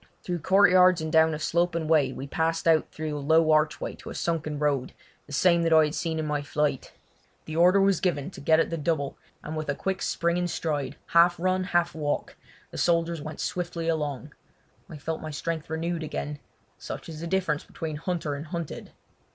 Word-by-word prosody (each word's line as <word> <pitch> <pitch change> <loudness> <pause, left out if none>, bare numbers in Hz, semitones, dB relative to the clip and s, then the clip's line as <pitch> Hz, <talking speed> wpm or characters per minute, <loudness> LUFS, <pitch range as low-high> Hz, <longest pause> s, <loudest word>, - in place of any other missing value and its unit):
Through 175 -1 -2
courtyards 185 0 +5
and 160 0 -3
down 160 0 +5
a - - -4
sloping 170 +1 0
way 150 -5 +3
we 135 - -6
passed 165 +3 -1
out 160 -2 +4
through 155 -1 -4
a - - -3
low 160 +2 +4
archway 155 0 +1
to - - -10
a - - -7
sunken 160 -3 -2
road, 145 -3 0 0.3
the - - -13
same 170 +4 +3
that 165 0 +1
I 160 -1 +7
had 150 - -3
seen 160 -1 -2
in 155 - -2
my 150 -1 -1
flight. 145 -1 -1 0.5
The 155 - -6
order 180 +4 +5
was 195 -2 +3
given 150 -7 -1
to - - -11
get 160 +2 +4
at 165 - +1
the 165 - -2
double, 145 -2 -1 0.3
and 155 - -5
with 155 -1 -4
a 140 - 0
quick, 190 +3 -3
springing 170 +1 0
stride, 155 -4 -2
half 170 +1 +5
run, 185 +1 +1
half 175 -2 +1
walk, 150 -2 -2 0.4
the - - -6
soldiers 170 -1 +1
went 155 +1 -7
swiftly 175 -2 -3
along. 150 -3 -2 0.6
I 155 - -8
felt 160 +2 -4
my 155 - -5
strength 155 +1 -4
renewed 165 +1 -2
again—such 150 -1 -7
is 160 -2 -8
the 170 - -4
difference 175 -5 0
between 155 -2 -6
hunter 165 -2 -2
and 145 +3 -6
hunted. 170 -2 -6
160 Hz, 200 wpm, -27 LUFS, 150-170 Hz, 0.6 s, I